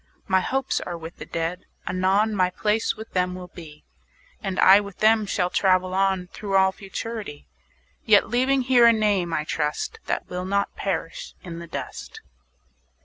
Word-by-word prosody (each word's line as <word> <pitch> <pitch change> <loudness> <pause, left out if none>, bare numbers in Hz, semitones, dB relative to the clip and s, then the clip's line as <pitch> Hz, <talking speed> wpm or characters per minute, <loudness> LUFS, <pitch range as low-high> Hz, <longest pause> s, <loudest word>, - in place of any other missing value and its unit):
My 190 0 +3
hopes 265 +7 -1
are 175 -1 -5
with 165 0 -10
the - - -9
Dead; 165 +2 -4 0.2
anon 195 +4 +2
My 185 -2 +2
place 210 +4 0
with 220 +1 -10
them 180 0 0
will 180 -1 -9
be, 155 -4 -12 0.6
20 - - -7
And 190 -1 -2
I 195 +2 +8
with 200 -2 -8
them 215 -1 +3
shall 180 -1 0
travel 185 -1 +2
on 190 -1 +1
Through 200 -2 -3
all 190 0 +4
Futurity; 200 -4 -7 0.6
Yet 210 -3 +5
leaving 260 +2 +2
here 245 -2 +5
a 230 - +7
name, 205 -6 +1
I 155 -2 -1
trust, 150 -1 -3
That - - -2
will 180 0 -4
not 200 +1 -1
perish - - -4
in 170 -2 -7
the 170 - -9
dust. - - -7
190 Hz, 175 wpm, -24 LUFS, 180-215 Hz, 0.6 s, I